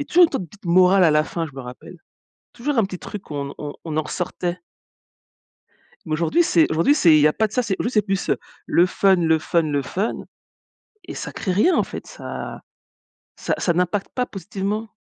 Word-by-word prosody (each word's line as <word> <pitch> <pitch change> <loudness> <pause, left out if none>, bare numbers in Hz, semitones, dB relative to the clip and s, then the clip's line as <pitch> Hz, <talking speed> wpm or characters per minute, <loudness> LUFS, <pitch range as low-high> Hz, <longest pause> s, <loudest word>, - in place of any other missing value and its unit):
avait - - -10
toujours 355 +1 +6
une - - +2
sorte - - -1
de 170 - -15
petite 200 +3 -19
morale 185 +2 +5
à 160 - +5
la 150 0 +3
fin, 165 -1 -3
je 145 - -13
me 135 - -6
rappelle. 125 +7 -11 0.6
Toujours 280 +4 -2
un 220 - +4
petit 185 -1 -7
truc 205 -5 -9
où - - -4
on 140 0 -4
on 145 -1 -5
on 155 -1 -3
en 155 - +3
ressortait. 180 +2 -4 1.5
Aujourd'hui, 165 - +1
c'est 165 - +3
aujourd'hui, 165 - +3
c'est 170 - +5
il - - +6
y 150 - +6
a 150 - +1
pas 220 - +1
de 210 - -22
ça, 250 - +2
c'est 215 -5 -1
juste, 235 0 -2
c'est 210 - +5
plus, 195 -2 -2
heu, - - +2 0.3
le 175 - +4
fun, 190 +1 +3
le 160 -2 +2
fun, 165 +1 +1
le 145 -2 0
fun 195 - -2 0.9
et - - -8
ça - - -6
créé 185 - -2
rien, 340 - +3
en - - +3
fait. - - -8
Ça - - -7 0.8
ça - - -2
ça 175 - +1
n'impacte 180 +3 -1
pas 250 - 0
positivement. 205 +2 -4
180 Hz, 225 wpm, -22 LUFS, 160-210 Hz, 1.5 s, toujours